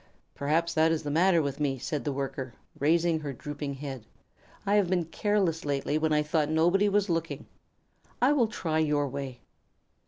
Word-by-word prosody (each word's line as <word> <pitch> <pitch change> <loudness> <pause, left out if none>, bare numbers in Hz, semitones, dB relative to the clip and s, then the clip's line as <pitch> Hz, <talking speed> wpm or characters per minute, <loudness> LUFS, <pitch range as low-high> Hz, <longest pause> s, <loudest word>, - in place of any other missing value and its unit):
'" - - -44
"Perhaps 165 +4 0
that 160 +1 +3
is 160 -1 -1
the 145 - -3
matter 170 +1 +4
with 140 0 -3
me," 140 -3 0
said 140 +3 -3
the 145 - 0
Worker, 135 -2 -4 0.2
raising 165 +2 +2
her 150 -2 -5
drooping 145 +2 -5
head. 135 -4 -6 0.6
"I 200 - +1
have 205 -4 +3
been 180 -3 +1
careless 185 -1 0
lately 145 +1 -1
when 160 0 0
I 150 0 +3
thought 150 0 0
nobody 175 +6 +3
was 205 0 +2
looking. 165 -2 -2 0.7
I 260 +4 +4
will 250 -6 +3
try 160 -7 -2
your 150 -2 +1
way." 135 -2 -6
155 Hz, 185 wpm, -28 LUFS, 145-170 Hz, 0.7 s, matter